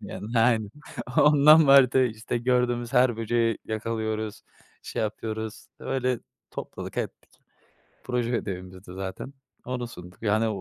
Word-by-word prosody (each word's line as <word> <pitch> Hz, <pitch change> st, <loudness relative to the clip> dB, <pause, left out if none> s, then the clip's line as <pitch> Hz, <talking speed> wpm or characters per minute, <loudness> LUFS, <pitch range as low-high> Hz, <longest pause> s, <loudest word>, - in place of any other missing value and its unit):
Yani, 115 Hz, +3 st, -4 dB
aynen. 115 Hz, -3 st, +3 dB, 0.5 s
Ondan 150 Hz, +1 st, +7 dB
vardı 135 Hz, -1 st, +6 dB
işte. 110 Hz, +1 st, -3 dB
Gördüğümüz 120 Hz, 0 st, 0 dB
her 125 Hz, -2 st, +4 dB
böceği 115 Hz, 0 st, 0 dB
yakalıyoruz, 110 Hz, -1 st, -3 dB, 0.4 s
şey -, -, -3 dB
yapıyoruz. 110 Hz, 0 st, -4 dB
Öyle 130 Hz, -2 st, -1 dB, 0.3 s
topladık -, -, -7 dB
ettik. -, -, -5 dB, 0.7 s
Proje 120 Hz, -2 st, -1 dB
ödevimizdi 95 Hz, -4 st, -4 dB
zaten. 95 Hz, +8 st, -6 dB, 0.3 s
Onu 125 Hz, -1 st, -3 dB
sunduk. 90 Hz, -5 st, -12 dB
Yani 110 Hz, +1 st, +2 dB
115 Hz, 115 wpm, -26 LUFS, 110-125 Hz, 0.7 s, Ondan